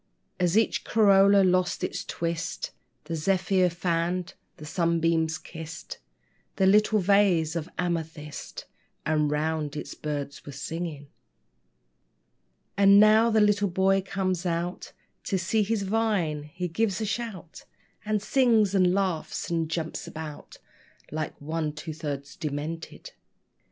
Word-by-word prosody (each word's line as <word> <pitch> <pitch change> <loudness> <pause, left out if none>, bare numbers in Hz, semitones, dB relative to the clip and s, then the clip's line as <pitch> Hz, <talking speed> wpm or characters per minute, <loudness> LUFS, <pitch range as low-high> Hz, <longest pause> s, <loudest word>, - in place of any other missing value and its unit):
As 180 +2 +2
each 225 - +2
corolla 200 -2 +5
lost 185 -1 +1
its - - -2
twist, 170 0 -3 0.3
The 165 +2 -4
zephyr 185 +2 +2
fanned, 175 +1 -1 0.2
the 150 - -10
sunbeam 165 0 +1
kissed 160 0 -7 0.6
The 190 - +2
little 210 +2 +4
vase 185 -5 +3
of 165 +1 -3
amethyst; 160 -5 -4 0.4
And 150 -1 +2
round 150 0 -1
it - - -6
birds 145 -2 -4
were 145 - -9
singing. 150 0 -5 1.7
And 200 0 +7
now 215 +2 +6
the 220 -1 +3
little 205 -1 +3
boy 190 +2 +2
comes 185 -2 -2
out 175 +1 -3 0.3
To 195 - 0
see 190 +5 +1
his 210 0 0
vine. 190 -8 0
He 180 +2 -3
gives 200 +4 0
a 220 - -1
shout, 205 -6 -5 0.4
And 210 -1 -1
sings 225 -6 +3
and 185 -2 +3
laughs, 185 -4 -2
and 165 -2 0
jumps 160 -1 -4
about 155 -2 -8 0.5
Like 155 0 -4
one 155 +1 -3
two 155 +1 -6
thirds 145 -3 -5
demented. 155 +1 -5
175 Hz, 125 wpm, -27 LUFS, 160-195 Hz, 1.7 s, And